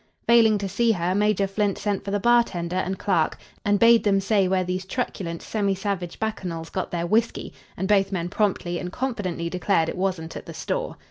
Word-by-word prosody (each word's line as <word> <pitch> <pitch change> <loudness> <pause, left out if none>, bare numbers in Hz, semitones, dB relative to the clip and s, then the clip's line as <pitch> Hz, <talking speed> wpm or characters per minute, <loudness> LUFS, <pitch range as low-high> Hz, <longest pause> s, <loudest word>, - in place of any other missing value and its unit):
Failing 225 -2 +5
to 200 -1 -3
see 230 +4 +2
her, 175 -1 -1
Major 205 0 +2
Flint 200 0 -1
sent 205 -2 -2
for - - -5
the 205 +1 0
bartender 195 -6 +2
and 190 +1 -1
clerk, 175 -6 +1 0.3
and 205 0 +3
bade 230 +1 +6
them 200 -2 +3
say 195 -1 +2
where 185 0 +1
these 185 +1 -3
truculent, 190 -6 -4
semi 200 -3 0
savage 190 -3 -3
bacchanals 180 -7 -4
got 185 - -3
their 170 -1 -2
whiskey, 225 +6 0 0.2
and 190 - -2
both 195 -1 +3
men 175 -3 -2
promptly 180 -3 -1
and 180 - -5
confidently 200 -9 -3
declared 180 -1 +1
it - - -4
wasn't 180 -3 -2
at - - -8
the - - -8
store. - - -3
195 Hz, 200 wpm, -24 LUFS, 180-210 Hz, 0.3 s, bade